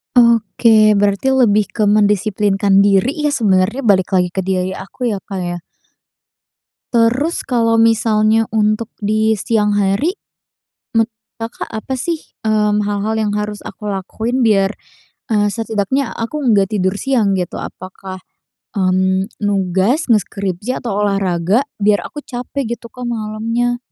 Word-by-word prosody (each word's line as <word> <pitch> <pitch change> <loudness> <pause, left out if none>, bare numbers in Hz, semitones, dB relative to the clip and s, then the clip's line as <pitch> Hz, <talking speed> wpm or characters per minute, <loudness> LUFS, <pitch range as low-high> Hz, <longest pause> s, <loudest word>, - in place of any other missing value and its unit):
Oke 225 -2 +4
berarti 200 +4 +1
lebih 215 -5 +3
ke 205 +2 -2
mendisiplinkan 205 -1 +2
diri 255 - +2
ya - - 0
sebenernya, 210 0 +1
balik 195 -5 +3
lagi 180 -1 +2
ke 190 - -3
diri 185 0 -1
aku 225 +6 -4
ya, 200 - -3
Kak, 190 -1 -6
ya? 175 0 -3 1.4
Terus 245 +8 +1
kalau 230 -2 +1
misalnya 225 -1 +3
untuk 215 +1 +1 0.2
di 215 +1 +2
siang 210 0 0
hari. 205 - +1 0.8
Menurut 225 0 +3 0.3
Kakak 225 +1 -5
apa 260 +4 -5
sih, 325 +3 -2 0.3
mmm, 210 -1 +2
hal-hal 205 +2 -1
yang 210 -1 0
harus 210 0 -3
aku 210 - -6
lakuin 220 +6 -3
biar, 195 -3 +3 0.6
eee, 210 -2 +2
setidaknya 225 +3 -1
aku 230 +7 -3
nggak 210 -6 +2
tidur 190 -1 0
siang 225 -8 +1
gitu. 180 -2 -4
Apakah, 185 0 -8 0.6
mmm, 190 0 +1
nugas, 200 - +1
ngeskripsi, 200 +1 -1
atau 205 -4 -2
olahraga 195 +2 +1 0.2
biar 205 0 +3
aku 295 - -7
capek 245 0 -4
gitu, 235 +1 -13
Kak, 250 -1 -7
malamnya? 230 +2 -2
210 Hz, 135 wpm, -17 LUFS, 195-230 Hz, 1.4 s, Oke